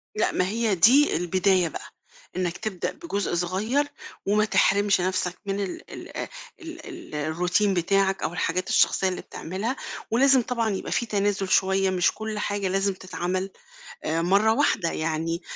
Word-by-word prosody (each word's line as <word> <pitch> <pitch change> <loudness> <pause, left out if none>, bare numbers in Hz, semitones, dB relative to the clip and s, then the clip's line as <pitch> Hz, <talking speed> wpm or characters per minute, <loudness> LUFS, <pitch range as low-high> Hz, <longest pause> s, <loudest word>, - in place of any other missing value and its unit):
لأ، 215 - +1
ما 185 - 0
هي 220 0 0
دي 260 - +5
البداية 185 +1 +2
بقى، - - -9 0.4
أنك 180 -2 -2
تبدأ 215 -5 -3
بجزء 205 - -3
صغير 210 +12 0 0.4
وما 210 +2 +3
تحرمش 200 -2 +3
نفْسك 180 -1 -1
من 195 0 -2
ال 195 -2 -5
ال - - -7 0.3
ال 330 0 -9 0.5
الRoutine 180 +5 +2
بتاعك 195 +2 +1
أو 160 - -2
الحاجات 180 +2 -1
الشخصية 190 - +3
اللي 185 - -4
بتعملها، 200 +9 -4 0.4
ولازم 265 +2 +5
طبعًا 235 -2 -1
يبقى 195 -2 -4
في 235 - +1
تنازل 200 -3 0
شوية، 190 0 +3
مش 180 -2 +2
كل 220 -1 -5
حاجة 205 -1 -1
لازم 195 +1 +1
تتعمل، 185 +1 -3 0.6
آآ، 165 +1 0
مرّة 200 +5 +4
واحدة 205 - +1
يعني، 165 +2 -2
195 Hz, 150 wpm, -25 LUFS, 180-215 Hz, 0.6 s, دي